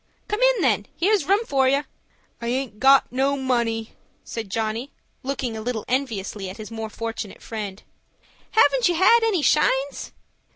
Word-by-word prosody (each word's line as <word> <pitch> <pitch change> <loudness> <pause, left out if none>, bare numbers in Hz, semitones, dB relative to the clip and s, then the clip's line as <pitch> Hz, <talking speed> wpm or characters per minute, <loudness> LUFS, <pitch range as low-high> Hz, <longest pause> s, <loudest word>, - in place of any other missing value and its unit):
"Come 420 +2 -2
in, - - +4
then. 210 -6 +2
Here's 395 -2 +2
room 400 +7 +2
for 270 -6 +2
you." 280 +2 +2 0.6
"I 235 - -4
aint 250 -3 -2
got 270 +1 +5
no 270 +2 +1
money," 235 -4 -1 0.3
said 225 -3 -6
Johnny, 225 +5 -2 0.3
looking 260 -3 -3
a 220 - -5
little 225 -1 -3
enviously 215 -7 -2
at 185 - -9
his 215 +1 -9
more 225 -1 -5
fortunate 225 -2 -6
friend. 210 -3 -6 0.7
"Haven't 475 -1 +4
you 350 - +1
had 380 +7 +6
any 420 -8 +1
shines?" 280 -2 +1
255 Hz, 160 wpm, -23 LUFS, 225-290 Hz, 0.7 s, had